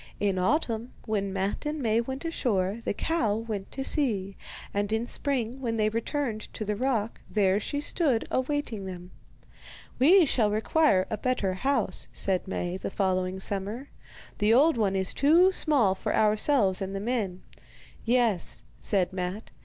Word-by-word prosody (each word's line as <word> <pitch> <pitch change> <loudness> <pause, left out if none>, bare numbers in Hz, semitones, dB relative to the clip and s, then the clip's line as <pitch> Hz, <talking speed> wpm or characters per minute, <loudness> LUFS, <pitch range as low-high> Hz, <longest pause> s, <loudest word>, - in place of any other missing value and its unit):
In 195 -2 0
autumn, 230 - 0
when 200 -3 -1
Matte 195 +8 -2
and 300 +1 -3
Maie 230 -3 +2
went 265 +5 -6
ashore, 215 - -1
the - - 0
cow 235 -10 0
went 215 -3 -5
to 270 - -3
sea, 205 -10 +1 0.4
and 205 +1 -1
in 220 +1 0
spring, 255 -2 -1
when 230 -3 -2
they 215 -1 +2
returned 230 0 -3
to 215 - -4
the 210 0 -1
rock, 230 -2 -1
there 200 -2 +2
she 285 +7 -3
stood 290 -6 0
awaiting 260 -7 -2
them. 180 -1 -8 0.9
'We 340 +7 +6
shall 230 -6 +2
require 215 -1 +2
a 215 - -2
better 230 -7 0
house,' 270 +10 0
said 190 -2 +1
Maie 180 -1 -3
the - - -5
following 185 -1 -1
summer; 205 +8 -3 0.5
'the 210 +1 +3
old 285 +7 +5
one 205 -4 +1
is 190 -1 +1
too 335 +7 +5
small 280 - +2
for 190 - -2
ourselves 215 -2 +3
and 195 0 -4
the - - -2
men.' 205 -5 -2 0.6
'Yes,' 230 -7 +1 0.2
said 190 -3 0
Matte. 185 +3 -4
215 Hz, 160 wpm, -27 LUFS, 195-260 Hz, 0.9 s, We